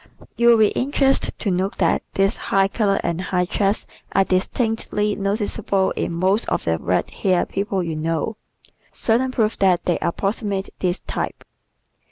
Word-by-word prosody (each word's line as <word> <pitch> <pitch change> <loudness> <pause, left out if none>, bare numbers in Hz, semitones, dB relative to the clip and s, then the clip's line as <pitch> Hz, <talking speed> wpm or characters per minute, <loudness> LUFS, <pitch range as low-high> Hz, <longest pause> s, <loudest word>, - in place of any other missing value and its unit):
You 235 - +2
will 235 -1 +7
be 215 -2 +5
interested 270 0 +1
to 205 - -1
note 185 +2 -1
that 170 -4 +2
this 195 0 +2
high 195 0 +1
color 200 -1 +1
and 170 +1 -1
high 180 -1 0
chest 200 +3 0 0.3
are 195 - +4
distinctly 210 +2 0
noticeable 200 -1 0
in - - -2
most 185 +6 +1
of - - -1
the 80 -1 0
red 90 +3 -1
haired 185 -2 0
people 195 -1 -1
you 165 -2 -3
know 165 +7 -2 0.5
certain 245 +3 +1
proof 225 -4 0
that 185 -2 +3
they 175 - +1
approximate 195 +2 -2
this 180 0 -1
type. - - -4
195 Hz, 160 wpm, -21 LUFS, 180-215 Hz, 0.5 s, will